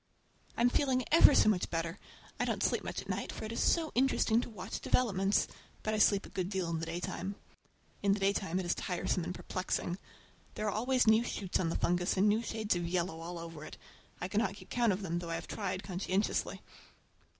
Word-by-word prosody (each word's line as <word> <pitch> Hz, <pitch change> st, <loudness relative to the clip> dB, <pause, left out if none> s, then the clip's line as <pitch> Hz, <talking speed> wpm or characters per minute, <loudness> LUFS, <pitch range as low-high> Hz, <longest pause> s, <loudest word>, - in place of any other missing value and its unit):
I'm 245 Hz, +1 st, +4 dB
feeling 260 Hz, -2 st, +2 dB
ever 305 Hz, -2 st, +8 dB
so -, -, +5 dB
much 200 Hz, -4 st, +2 dB
better! 165 Hz, +3 st, -2 dB, 0.4 s
I -, -, +2 dB
don't -, -, -1 dB
sleep -, -, +1 dB
much -, -, -4 dB
at -, -, -16 dB
night, -, -, -2 dB
for -, -, -6 dB
it 215 Hz, -, -5 dB
is 230 Hz, -, -3 dB
so 325 Hz, -2 st, +2 dB
interesting 245 Hz, -3 st, +3 dB
to -, -, -6 dB
watch 200 Hz, -3 st, -6 dB
developments; 200 Hz, -5 st, +2 dB, 0.4 s
but 215 Hz, -, -1 dB
I 215 Hz, -, 0 dB
sleep 200 Hz, -1 st, +4 dB
a -, -, -11 dB
good 185 Hz, -1 st, -3 dB
deal 190 Hz, -4 st, -1 dB
in 165 Hz, -, -1 dB
the 165 Hz, -, -4 dB
daytime. 175 Hz, +3 st, -4 dB, 0.7 s
In 200 Hz, -1 st, +3 dB
the 205 Hz, -, -1 dB
daytime 195 Hz, -2 st, +1 dB
it 185 Hz, -, -3 dB
is 175 Hz, -, +2 dB
tiresome 180 Hz, 0 st, -1 dB
and 180 Hz, +1 st, -4 dB
perplexing. 185 Hz, 0 st, -2 dB, 0.6 s
There 215 Hz, -, -3 dB
are 210 Hz, -, +1 dB
always 250 Hz, +3 st, +2 dB
new 220 Hz, +1 st, +5 dB
shoots 195 Hz, -5 st, -2 dB
on 170 Hz, -, +1 dB
the -, -, -2 dB
fungus, 180 Hz, +2 st, +1 dB
and 195 Hz, +3 st, +4 dB
new 210 Hz, +2 st, +3 dB
shades 220 Hz, -3 st, -1 dB
of 175 Hz, -1 st, -2 dB
yellow 170 Hz, -1 st, -1 dB
all 170 Hz, +1 st, -6 dB
over 165 Hz, -2 st, -8 dB
it. -, -, -9 dB, 0.4 s
I 180 Hz, -, -2 dB
cannot 200 Hz, 0 st, 0 dB
keep -, -, -14 dB
count 240 Hz, -3 st, +3 dB
of 195 Hz, +2 st, -2 dB
them, 170 Hz, -2 st, -1 dB
though 170 Hz, -1 st, -6 dB
I 165 Hz, -, -1 dB
have -, -, -5 dB
tried 185 Hz, -, -3 dB
conscientiously. 190 Hz, +2 st, -1 dB
195 Hz, 220 wpm, -33 LUFS, 175-220 Hz, 0.7 s, ever